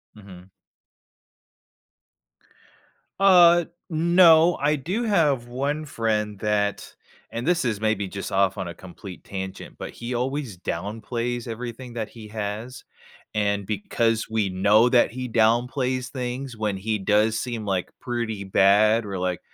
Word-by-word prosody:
Mhm. 95 -3 -14 2.7
Uh, 175 -3 +6 0.2
no. 170 0 +5
I 150 +1 +2
do 180 - -3
have 150 - +2
1 140 +5 -2
friend 105 -6 -2
that 105 -1 -1 0.4
and 120 +6 -4
this 175 -1 +2
is 110 -4 -1
maybe 110 -3 0
just 100 0 -6
off 95 +1 +2
on 95 -2 -4
a 85 - -6
complete 95 0 -11
tangent, 95 -1 -7
but - - -7
he 120 +1 -6
always 125 -4 -3
downplays 115 +7 -4
everything 120 +1 -7
that 110 -2 -4
he 110 -2 -11
has, 110 +4 -5 0.5
and 100 -1 0
because 110 +2 -1
we 110 -3 0
know 105 +5 +4
that 120 -2 +4
he 125 0 -5
downplays 125 +3 +1
things 125 -1 -5
when 105 -2 -1
he 105 +3 -2
does 105 +2 +2
seem, 120 -3 -4
like, 95 -3 -1
pretty 115 -4 -3
bad, 105 +3 +4
we're 100 -2 -4
like, 90 -1 -2
115 Hz, 135 wpm, -24 LUFS, 100-125 Hz, 2.7 s, Uh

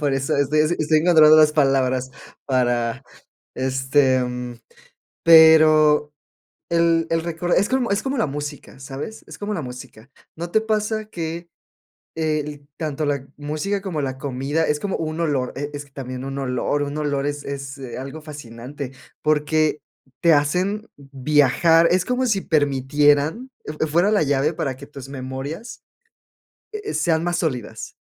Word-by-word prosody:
Por 145 -2 0
eso, 135 0 -1
estoy 145 +2 +2
así, 160 +3 +1
estoy 155 0 +3
encontrando 155 -2 +7
las 155 -1 +6
palabras 130 -3 +1 0.4
para, 120 -2 0 0.5
este, 130 0 +2 1.0
pero 155 -2 +6 0.6
el 165 -1 +3
el 165 0 +1
récord 170 +1 -2
es 200 - +2
como 255 -4 0
es 200 - +1
como 270 +1 -2
la 230 - +2
música, 145 -1 -7
¿sabes? 140 +10 -7
Es - - -10
como 210 +1 -4
la 175 - -3
música. 125 -2 -10 0.3
¿No 170 +2 -5
te 220 - +4
pasa 215 0 -1
que?, 170 -3 -6 0.7
el 150 -2 -2
tanto 155 -1 -3
la 140 -2 -2
música 155 +8 -3
como 175 -7 -3
la 130 -1 -3
comida, 140 +3 -1
es 150 - 0
como 195 +1 -2
un 160 0 -4
olor, 140 -6 0
e 145 +2 -4
es 145 0 -6
que - - -25
también 130 -1 -6
un 135 0 -5
olor, 135 +2 -1
un 145 +1 -4
olor 145 -2 -1
es 145 0 -4
es, 140 0 -6
eh, 130 -3 -7
algo 135 +4 -7
fascinante, 140 -2 -8 0.3
porque 155 0 +1 0.4
te 170 -2 +5
hacen 185 +9 0
viajar, 145 +4 +3
es 180 0 +2
como 250 +1 0
si 200 -5 +1
permitieran 145 - +2
e - - -5
eh, 155 +1 -2
fuera 170 +7 +2
la 210 -4 +3
llave 145 +1 +1
para 135 -4 -3
que 140 +2 -11
tus 140 -3 -11
memorias, 140 - -7 0.9
eh, 420 0 -5
sean 165 -1 +1
más 175 0 0
sólidas. 125 -10 -4
150 Hz, 160 wpm, -22 LUFS, 135-165 Hz, 1.0 s, encontrando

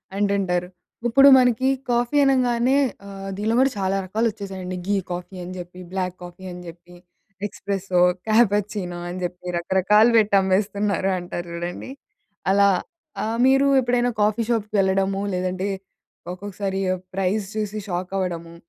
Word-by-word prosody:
అంటుంటారు. 195 -3 0 0.4
ఇప్పుడు 270 +4 +6
మనకి 250 0 +3 0.2
కాఫీ 240 +4 +1
అనంగానే 255 -1 +2 0.3
ఆహ్, 195 0 -7
దీనిలో 220 +2 0
కూడా 265 0 +4
చాలా 190 0 0
రకాలొచ్చేసాయండి. 195 -3 -3
ఘీ 205 - +2 0.2
కాఫీ 180 +2 -6
అని 180 +1 -7
చెప్పి, 180 0 -9
బ్లాక్ 185 -1 -2
కాఫీ 175 +1 -11
అని 180 0 -8
చెప్పి, 175 +1 -13 0.5
ఎక్స్‌ప్రెస్సో, 195 -2 -1 0.3
క్యాపచినో 205 -4 +1
అని 180 - -5
చెప్పి 180 0 -5
రకరకాలు 195 +6 +4
పెట్టి 210 -2 +3
అమ్మేస్తున్నారు 195 0 0
అంటారు 175 0 -6
చూడండి. 175 +8 -5 0.6
అలా 200 0 +5 0.5
ఆహ్, 225 +1 -2
మీరు 270 +1 +4
ఎప్పుడైనా 245 0 +1
కాఫీ 215 +2 +2
షాప్‌కి 215 -2 -1
వెళ్ళడము 195 0 +1
లేదంటే, 185 +2 -2 0.6
ఒక్కొక్కసారి 195 0 -4
ఆ - - -1 0.2
ప్రైస్ 195 +2 0
చూసి 215 -1 -3
షాక్ 180 +1 -3
అవ్వడము? 170 -3 -4
195 Hz, 130 wpm, -23 LUFS, 180-220 Hz, 0.6 s, ఇప్పుడు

